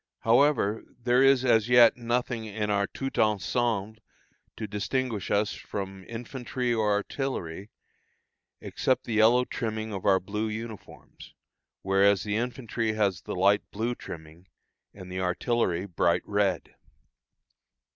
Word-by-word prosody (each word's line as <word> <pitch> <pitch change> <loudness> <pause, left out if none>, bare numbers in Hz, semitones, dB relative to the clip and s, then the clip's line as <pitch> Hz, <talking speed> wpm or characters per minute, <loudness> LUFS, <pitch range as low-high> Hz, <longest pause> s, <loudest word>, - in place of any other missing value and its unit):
However, 115 -3 +3 0.2
there 120 +1 +3
is 135 -1 +5
as 115 -2 +3
yet 120 -1 +7
nothing 120 -1 -2
in 105 0 -3
our 100 -1 +1
tout 135 0 -5
ensemble 110 0 0 0.6
to 110 - -4
distinguish 105 +2 -2
us 105 0 +1
from 95 -2 -7
infantry 120 +1 -3
or 110 -2 +1
artillery, 105 - -3 0.9
except 130 - 0
the 115 - -5
yellow 115 +3 +5
trimming 110 -3 -4
of 95 - -5
our 95 -1 +4
blue 105 +4 -3
uniforms, 110 -1 -9 0.5
whereas 95 0 +3
the 105 -1 -2
infantry 115 -1 -2
has 100 -5 0
the - - -6
light 100 +3 +4
blue 115 +4 -2
trimming, 80 -3 -11 0.4
and 95 -2 -11
the 95 0 -3
artillery 90 0 0
bright 85 -2 +1
red. 100 -4 0
110 Hz, 125 wpm, -27 LUFS, 100-120 Hz, 0.9 s, yet